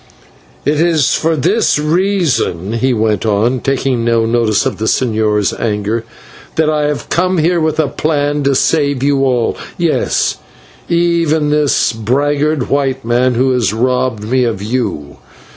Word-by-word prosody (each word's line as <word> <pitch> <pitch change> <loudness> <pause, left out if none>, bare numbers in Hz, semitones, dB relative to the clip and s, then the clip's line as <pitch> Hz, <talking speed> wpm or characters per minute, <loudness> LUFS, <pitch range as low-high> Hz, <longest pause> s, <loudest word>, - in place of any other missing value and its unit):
"It 145 +2 +1
is 165 -5 +2
for 165 0 +1
this 180 - +1
reason," 155 - 0
he 130 +3 0
went 110 -3 0
on, 110 +4 +1
taking 135 -3 -1
no 115 -1 +2
notice 115 -2 +1
of - - -3
the 110 - -2
señor's 110 -4 +1
anger, 110 +1 -2 0.5
"that 155 -1 +2
I 150 -1 0
have 150 -1 -4
come 185 +1 +1
here 170 +2 +2
with 160 0 -1
a 155 - +2
plan 145 -1 -1
to 140 -1 +2
save 140 -2 +1
you 140 -1 +2
all; 125 -3 +1 0.2
yes, - - 0 0.5
even 170 -3 +1
this 150 -5 +2
braggart 140 +5 0
white 135 -3 -1
man 120 +1 +1
who 130 +2 +2
has 115 -5 0
robbed 125 -2 0
me 125 +4 +1
of 115 -5 -1
you. 105 - -3
130 Hz, 150 wpm, -14 LUFS, 115-150 Hz, 0.5 s, is